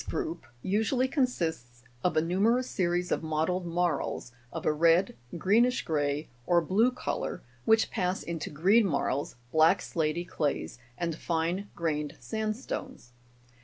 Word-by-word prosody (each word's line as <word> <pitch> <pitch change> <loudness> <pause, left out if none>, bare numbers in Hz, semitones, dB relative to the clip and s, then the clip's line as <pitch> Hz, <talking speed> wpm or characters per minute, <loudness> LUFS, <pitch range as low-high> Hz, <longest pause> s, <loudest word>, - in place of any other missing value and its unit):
53 - - -2
group 165 -4 -6 0.2
usually 220 +6 +1
consists 165 - -1 0.2
of 180 - +1
a 155 - +4
numerous 220 +9 +2
series 175 -1 0
of - - +1
mottled 160 +3 -1
marls, 170 -7 -1 0.2
of - - -5
a 155 - +3
red, 165 +4 +4 0.2
greenish 230 +8 +3
grey, 145 -1 0 0.2
or 175 -1 +5
blue 195 +9 +3
colour, 250 - -3 0.2
which 220 0 +4
pass 185 -3 -1
into 165 -2 -4
green 195 +9 +4
marls, 140 -3 -1 0.2
black 160 +5 +5
slaty 160 +1 -1
clays, 140 - -2 0.2
and 170 -2 -1
fine 170 +5 -1
grained 150 -3 -2
sandstones. 220 - -4
175 Hz, 135 wpm, -29 LUFS, 155-210 Hz, 0.2 s, or